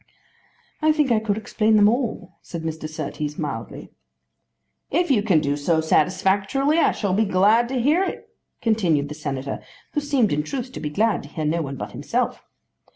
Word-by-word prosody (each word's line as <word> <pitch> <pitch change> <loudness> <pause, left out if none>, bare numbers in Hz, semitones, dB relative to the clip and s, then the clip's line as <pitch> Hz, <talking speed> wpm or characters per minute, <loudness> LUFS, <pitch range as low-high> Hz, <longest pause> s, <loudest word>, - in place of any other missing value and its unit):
"I 310 0 +4
think 300 -4 +1
I 225 - +4
could 215 -2 -1
explain 220 0 +1
them 205 -1 +6
all," 225 -5 -1
said 170 -2 -7
Mr. 160 -1 -4
Surtees 150 -1 -4
mildly. 120 -8 -5 1.0
"If 345 +1 +1
you 225 -6 +4
can 195 -7 +3
do 145 0 0
so 160 +3 +1
satisfactorily, 195 - +2
I - - +4
shall 200 -4 -2
be 205 - +2
very 200 -3 -1
glad 215 +6 +4
to 260 -1 -1
hear 300 +10 +3
it," 390 - -5 0.4
continued 175 -11 +2
the - - -5
Senator, 140 -3 -4 0.3
who - - +1
seemed 275 - +1
in 150 - +1
truth 250 - -5
to - - -7
be 150 - -3
glad 215 +8 +1
to 145 - -12
hear 155 +1 -4
no 165 +3 +1
one 140 -3 -4
but - - -6
himself. - - -2
195 Hz, 190 wpm, -23 LUFS, 155-240 Hz, 1.0 s, them